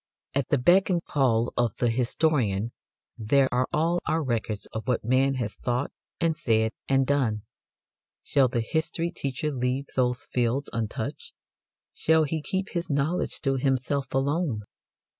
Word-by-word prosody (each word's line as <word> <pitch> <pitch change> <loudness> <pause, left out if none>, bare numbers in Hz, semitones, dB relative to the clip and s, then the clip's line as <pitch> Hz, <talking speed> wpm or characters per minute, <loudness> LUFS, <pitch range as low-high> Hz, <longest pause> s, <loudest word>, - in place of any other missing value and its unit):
At 140 -2 0
the 145 - +3
beck 175 +10 +4
and 175 -2 +1
call 120 -5 +1
of 120 -4 +1
the 120 -2 +2
historian 120 -4 +1 0.5
there 130 +5 +3
are 125 +1 +2
all 165 +3 +2
our 160 0 +1
records 115 -5 -2
of 110 +2 -5
what 125 -2 +1
man 135 +3 +3
has 120 -5 -2
thought 125 +3 -2 0.3
and 165 -1 +2
said 110 -5 +1 0.2
and 135 0 +3
done. 125 -7 +1 0.8
Shall 135 -2 +3
the 120 -1 -1
history 160 +6 -1
teacher 140 -2 -3
leave 130 +1 -1
those 125 -1 +1
fields 125 +3 0
untouched? 110 -2 -4 0.6
Shall 160 0 +3
he 155 +1 -2
keep 190 +5 -2
his 170 -1 -3
knowledge 150 +5 0
to 135 -2 +1
himself 135 +1 0
alone? 135 -4 0
135 Hz, 150 wpm, -27 LUFS, 120-150 Hz, 0.8 s, beck